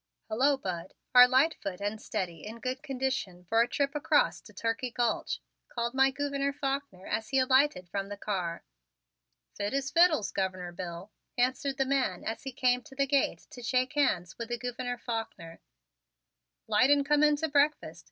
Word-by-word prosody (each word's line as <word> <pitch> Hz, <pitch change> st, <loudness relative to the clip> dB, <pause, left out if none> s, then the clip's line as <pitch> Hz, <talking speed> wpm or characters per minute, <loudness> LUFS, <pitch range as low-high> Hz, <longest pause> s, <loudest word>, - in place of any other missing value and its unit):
"Hello, 270 Hz, +6 st, +3 dB
Bud. 180 Hz, -6 st, -5 dB, 0.2 s
Are 250 Hz, 0 st, +10 dB
Lightfoot 255 Hz, -, +1 dB
and 205 Hz, +2 st, -3 dB
Steady 180 Hz, -7 st, -4 dB
in 225 Hz, +2 st, -8 dB
good 255 Hz, +2 st, -3 dB
condition 260 Hz, -10 st, -3 dB
for 225 Hz, +6 st, +3 dB
a 235 Hz, -, +3 dB
trip 280 Hz, +2 st, -1 dB
across 400 Hz, +11 st, +2 dB
to -, -, -15 dB
Turkey 230 Hz, +2 st, -2 dB
Gulch?" 240 Hz, -1 st, -1 dB, 0.3 s
called 235 Hz, 0 st, -2 dB
my 265 Hz, 0 st, +4 dB
Gouverneur 280 Hz, 0 st, -2 dB
Faulkner 275 Hz, -9 st, -3 dB
as 220 Hz, +1 st, -2 dB
he 270 Hz, -, +1 dB
alighted 260 Hz, -7 st, +3 dB
from 195 Hz, +2 st, -4 dB
the 205 Hz, -, -6 dB
car. 185 Hz, -5 st, -3 dB, 0.9 s
"Fit 205 Hz, +5 st, -3 dB
as 275 Hz, +1 st, -1 dB
fiddles, 335 Hz, -, +4 dB
Governor 185 Hz, -2 st, -2 dB
Bill," 175 Hz, +3 st, -7 dB, 0.3 s
answered 260 Hz, +2 st, 0 dB
the 270 Hz, -, +2 dB
man 260 Hz, -9 st, 0 dB
as 225 Hz, -, -4 dB
he 270 Hz, -, -6 dB
came 250 Hz, -1 st, +2 dB
to 270 Hz, -, -15 dB
the 275 Hz, 0 st, +2 dB
gate 275 Hz, 0 st, 0 dB
to 245 Hz, -, -10 dB
shake 255 Hz, +2 st, 0 dB
hands 190 Hz, -, 0 dB
with 235 Hz, 0 st, -5 dB
the 240 Hz, -, -1 dB
Gouverneur 245 Hz, 0 st, -4 dB
Faulkner. 225 Hz, -9 st, -6 dB, 1.1 s
"'Light 255 Hz, -, +4 dB
and 285 Hz, -1 st, +4 dB
come 295 Hz, 0 st, +3 dB
in 300 Hz, 0 st, +5 dB
to 320 Hz, +2 st, -1 dB
breakfast. 285 Hz, -, +1 dB
250 Hz, 175 wpm, -30 LUFS, 205-275 Hz, 1.1 s, Are